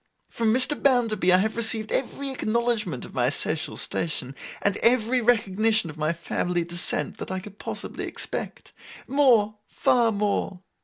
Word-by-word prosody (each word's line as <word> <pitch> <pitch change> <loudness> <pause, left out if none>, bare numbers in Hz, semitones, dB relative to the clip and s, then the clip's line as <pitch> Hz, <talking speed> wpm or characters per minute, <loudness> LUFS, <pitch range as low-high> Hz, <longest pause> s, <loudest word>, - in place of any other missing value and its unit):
From 225 -2 +1
Mr. 255 +5 +1
Bounderby 230 -9 +3
I 180 - +7
have 215 +4 0
received 225 -1 -1
every 275 +1 -1
acknowledgment 225 - -1
of - - -12
my 125 -1 +2
social 155 +3 -2
station, 145 -5 -3 0.3
and 200 -1 +2
every 245 +1 +4
recognition 215 -4 +2
of 150 - -15
my 155 +1 +1
family 175 +1 -2
descent, 175 +1 -2
that - - -6
I 185 - -2
could 200 +2 -10
possibly - - -5
expect. - - -5 0.3
More, 235 -7 +3
far 235 -2 +2
more. 200 -3 -1
215 Hz, 150 wpm, -25 LUFS, 180-235 Hz, 0.3 s, I